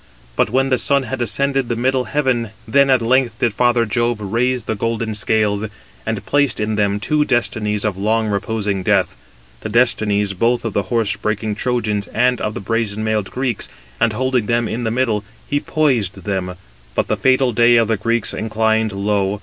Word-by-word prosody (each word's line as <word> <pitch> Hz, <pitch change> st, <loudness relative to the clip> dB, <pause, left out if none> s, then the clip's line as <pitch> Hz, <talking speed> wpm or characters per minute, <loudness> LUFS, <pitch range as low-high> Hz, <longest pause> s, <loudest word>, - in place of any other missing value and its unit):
But -, -, +2 dB
when 135 Hz, +3 st, +1 dB
the 130 Hz, -, +2 dB
sun 140 Hz, -1 st, +2 dB
had 130 Hz, 0 st, -4 dB
ascended 135 Hz, +2 st, 0 dB
the 120 Hz, -, 0 dB
middle 130 Hz, +2 st, 0 dB
heaven, 130 Hz, -6 st, 0 dB, 0.2 s
then 140 Hz, +5 st, +4 dB
at 130 Hz, -3 st, +3 dB
length 120 Hz, -1 st, +2 dB
did 115 Hz, -3 st, 0 dB
Father 120 Hz, +1 st, +2 dB
Jove 120 Hz, +1 st, 0 dB
raise 120 Hz, +4 st, 0 dB
the 110 Hz, -, -2 dB
golden 115 Hz, +1 st, -2 dB
scales, 105 Hz, -1 st, +1 dB, 0.4 s
and -, -, -3 dB
placed 145 Hz, -5 st, +1 dB
in 105 Hz, 0 st, -1 dB
them 105 Hz, -1 st, +1 dB
two 150 Hz, +7 st, +1 dB
destinies 110 Hz, -5 st, 0 dB
of 100 Hz, -3 st, -2 dB
long 110 Hz, +2 st, +1 dB
reposing 100 Hz, -1 st, -2 dB
death, -, -, +1 dB, 0.4 s
[the 110 Hz, -, -6 dB
destinies] 105 Hz, -4 st, +2 dB
both 115 Hz, +5 st, +1 dB
of 115 Hz, -, -2 dB
the 100 Hz, -, -2 dB
horse 115 Hz, -4 st, +1 dB
breaking 110 Hz, 0 st, -2 dB
Trojans 105 Hz, -3 st, -1 dB
and 125 Hz, +1 st, +1 dB
of 105 Hz, 0 st, -2 dB
the -, -, -3 dB
brazen 110 Hz, 0 st, -2 dB
mailed 110 Hz, -2 st, -1 dB
Greeks, 130 Hz, -3 st, -3 dB, 0.3 s
and 115 Hz, -, +3 dB
holding 125 Hz, -1 st, 0 dB
them 120 Hz, -1 st, +1 dB
in 120 Hz, +2 st, -3 dB
the -, -, +1 dB
middle, 115 Hz, -3 st, 0 dB, 0.2 s
he 145 Hz, -, 0 dB
poised 130 Hz, -13 st, 0 dB
them; 95 Hz, -3 st, -3 dB, 0.4 s
but -, -, 0 dB
the -, -, +1 dB
fatal 130 Hz, -1 st, +2 dB
day 120 Hz, +2 st, +5 dB
of 115 Hz, -2 st, +4 dB
the 110 Hz, -, +1 dB
Greeks 115 Hz, +2 st, 0 dB
inclined 110 Hz, 0 st, 0 dB
low. 100 Hz, 0 st, 0 dB
115 Hz, 190 wpm, -19 LUFS, 105-125 Hz, 0.4 s, day